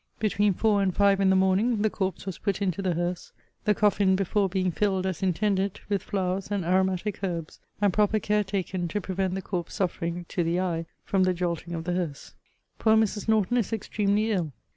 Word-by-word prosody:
Between 205 -2 +1
four 210 -1 +2
and 195 -1 +2
five 200 -1 +4
in 195 -1 +4
the 190 - +4
morning, 200 +4 +2
the 215 - +3
corpse 190 -4 -3
was 190 -3 -5
put 200 -1 -1
into 195 -2 -1
the 185 -3 0
hearse; 175 +1 -3 0.3
the 210 -1 +3
coffin 200 -2 +3
before 195 +1 +1
being 185 -1 0
filled, 190 0 0
as 190 -3 -2
intended, 195 +1 0
with 200 -2 +1
flowers 190 0 -2
and 200 -4 -1
aromatic 190 +3 0
herbs, 170 -4 -4 0.2
and 205 -3 +2
proper 210 +2 +3
care 210 0 +1
taken 190 -2 -2
to 205 - -2
prevent 190 -1 -2
the 190 - -4
corpse 175 -3 -4
suffering 175 -2 -2
(to 175 - 0
the 170 +2 0
eye) 165 -3 -2 0.2
from 195 - +1
the 185 -1 +3
jolting 170 -1 -3
of 165 - -4
the 175 +1 -2
hearse. 170 -6 -4 0.5
Poor 220 -1 +4
Mrs. 215 -1 0
Norton 220 +1 +2
is 230 -6 0
extremely 210 0 0
ill. 170 -8 -1
190 Hz, 205 wpm, -27 LUFS, 180-205 Hz, 0.5 s, five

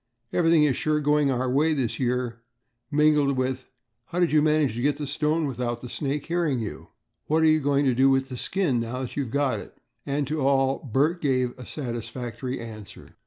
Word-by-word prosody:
"Everything 165 -2 +4
is 140 -4 +3
sure 155 +3 0
going 150 -1 +2
our 130 -1 0
way 150 +5 +2
this 125 -6 -2
year," 125 -2 -1 0.5
mingled 150 -2 +3
with 130 0 -2 0.4
"How 175 - -4
did 175 -2 +3
you 155 0 +4
manage 150 -4 +2
to 120 - -4
get 145 +2 +1
the 150 - -4
stone 155 +3 0
without 120 -3 -3
the 125 - -8
snake 145 -1 -2
hearing 170 -5 0
you?" 110 -3 -6 0.4
"What 160 +1 +2
are - - +5
you 155 0 +5
going 140 0 +1
to 130 - +3
do 135 +3 +4
with 135 0 +1
the 130 - -5
skin 155 -2 0
now 120 +3 -3
that 125 - -6
you've 140 -4 -2
got 140 +2 0
it?" - - -12 0.3
And 140 +1 -1
to 150 +2 -2
all 135 0 +2
Bert 155 +9 +2
gave 130 -4 0
a 125 -2 -11
satisfactory 120 -1 -5
answer. 110 -5 -10
135 Hz, 205 wpm, -25 LUFS, 125-150 Hz, 0.5 s, are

